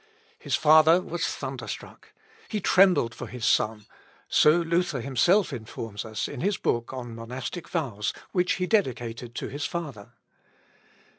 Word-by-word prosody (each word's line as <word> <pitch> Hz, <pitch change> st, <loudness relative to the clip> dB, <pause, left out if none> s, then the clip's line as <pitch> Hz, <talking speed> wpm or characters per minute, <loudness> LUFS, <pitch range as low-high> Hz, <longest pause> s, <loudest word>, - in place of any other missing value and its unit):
His -, -, -1 dB
father 160 Hz, +2 st, +6 dB
was 175 Hz, -1 st, -3 dB
thunderstruck. -, -, -7 dB, 0.4 s
He 215 Hz, -, -2 dB
trembled 185 Hz, -, +4 dB
for -, -, -7 dB
his 125 Hz, -3 st, -5 dB
son, 105 Hz, -1 st, +1 dB, 0.4 s
so -, -, +5 dB
Luther 170 Hz, -3 st, 0 dB
himself 145 Hz, -, +2 dB
informs 110 Hz, -2 st, -6 dB
us 110 Hz, -1 st, -3 dB
in 140 Hz, -, -7 dB
his 200 Hz, +3 st, +1 dB
book 120 Hz, 0 st, -1 dB
on 125 Hz, -3 st, -6 dB
Monastic 125 Hz, +9 st, -6 dB
Vows, 120 Hz, -, -2 dB, 0.2 s
which 180 Hz, -1 st, +2 dB
he 185 Hz, -, -1 dB
dedicated 120 Hz, -, -1 dB
to -, -, -4 dB
his 145 Hz, +1 st, -4 dB
father. 145 Hz, -12 st, -6 dB
135 Hz, 140 wpm, -26 LUFS, 115-175 Hz, 0.4 s, father